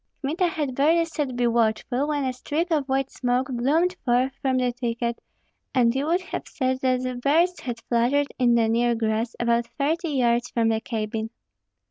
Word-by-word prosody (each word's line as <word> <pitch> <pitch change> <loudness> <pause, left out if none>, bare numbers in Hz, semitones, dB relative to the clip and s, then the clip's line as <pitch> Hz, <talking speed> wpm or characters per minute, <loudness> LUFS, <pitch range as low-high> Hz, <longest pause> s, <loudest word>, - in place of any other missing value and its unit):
Kmita 330 +7 +1
had 300 -5 -2
barely 320 +6 +3
said, 295 -6 -3
"Be 245 0 +1
watchful," 235 +3 +1
when 290 -2 -1
a 260 - -1
streak 310 +7 -2
of 290 -4 0
white 270 0 0
smoke 250 +1 -1
bloomed 305 +9 +1
forth 250 +2 +2
from 260 -1 +1
the 250 -1 +1
thicket, 235 -1 -3 0.5
and 235 -2 +4
you 275 +3 -1
would 345 +3 +2
have 365 - -6
said 260 -3 -1
that 255 -1 0
birds 330 +5 +2
had 240 -6 -5
fluttered 245 +5 +1
in 240 -2 +4
the 230 -1 +3
near 235 +1 +2
grass, 225 +1 -1
about 235 0 +1
thirty 320 +4 0
yards 240 -4 +1
from 230 -1 +1
the 220 0 0
cabin. 220 -1 -3
255 Hz, 180 wpm, -24 LUFS, 235-290 Hz, 0.5 s, and